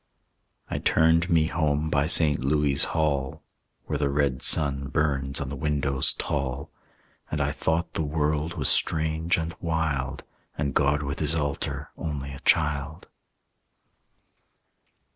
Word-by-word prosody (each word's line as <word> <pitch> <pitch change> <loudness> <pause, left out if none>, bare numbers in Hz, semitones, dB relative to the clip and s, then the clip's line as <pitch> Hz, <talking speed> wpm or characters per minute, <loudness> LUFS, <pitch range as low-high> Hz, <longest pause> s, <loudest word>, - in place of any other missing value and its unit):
I - - -3
turned 80 +2 +3
me 80 -2 +3
home 80 -1 -1
by 70 0 +2
St. 75 -4 +5
Louis' 70 0 +2
Hall, 70 -4 -1 0.4
Where 75 - -3
the 70 -1 +1
red 70 -2 0
sun 70 -3 +2
burns 70 -2 -1
on 70 - -4
the 70 - -5
windows 70 -1 +1
tall. 70 -2 -3 0.6
And - - -3
I - - 0
thought 80 +2 -1
the - - -2
world 75 +1 -1
was 70 -6 -1
strange 80 +2 +1
and 80 0 -3
wild, 80 -6 -2 0.3
And 70 -2 -2
God 75 +1 +2
with 70 0 -4
his 80 +1 +1
altar 70 -3 -3
only 70 -3 -4
a 70 - -9
child. 75 +1 0
75 Hz, 135 wpm, -26 LUFS, 70-80 Hz, 0.6 s, St